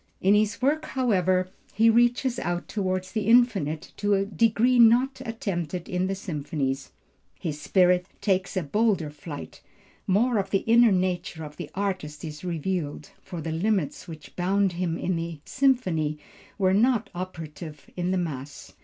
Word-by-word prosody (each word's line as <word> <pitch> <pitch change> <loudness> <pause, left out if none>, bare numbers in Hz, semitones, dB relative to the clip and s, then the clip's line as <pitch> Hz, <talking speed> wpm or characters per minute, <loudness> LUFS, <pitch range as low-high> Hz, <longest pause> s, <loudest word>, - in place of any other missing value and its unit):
In 195 +2 +4
this 210 +3 +1
work, 305 +3 +2
however, 185 - +1 0.3
he 225 +2 +4
reaches 240 +2 +3
out 175 0 -2
toward 185 -3 -1
the 215 -2 -1
infinite 215 - +3
to 205 0 +2
a 195 0 +1
degree 230 +4 +2
not 245 +4 +5
attempted 185 - -4
in 180 +1 -1
the 195 - -1
symphonies; 145 -7 -3 0.5
his 150 -3 -4
spirit 180 +1 +3
takes 190 -1 0
a 185 - +1
bolder 195 -2 +1
flight; 145 - -9 0.5
more 220 +4 +3
of 195 - -2
the 195 - +1
inner 235 0 +6
nature 180 -2 -1
of 150 -1 -9
the 175 -4 -6
artist 185 -7 -3
is 150 0 -8
revealed; 165 -3 -3
for 175 -3 -7
the 160 +1 -4
limits 180 -2 -1
which 160 -3 -11
bound 195 +2 +1
him 170 -1 -2
in 180 -1 -1
the 165 -2 -5
symphony 185 - +1 0.4
were 190 -2 +3
not 225 0 +2
operative 160 -4 -7
in 180 0 -1
the 190 - +1
mass. 145 -5 -5
185 Hz, 155 wpm, -26 LUFS, 165-215 Hz, 0.5 s, inner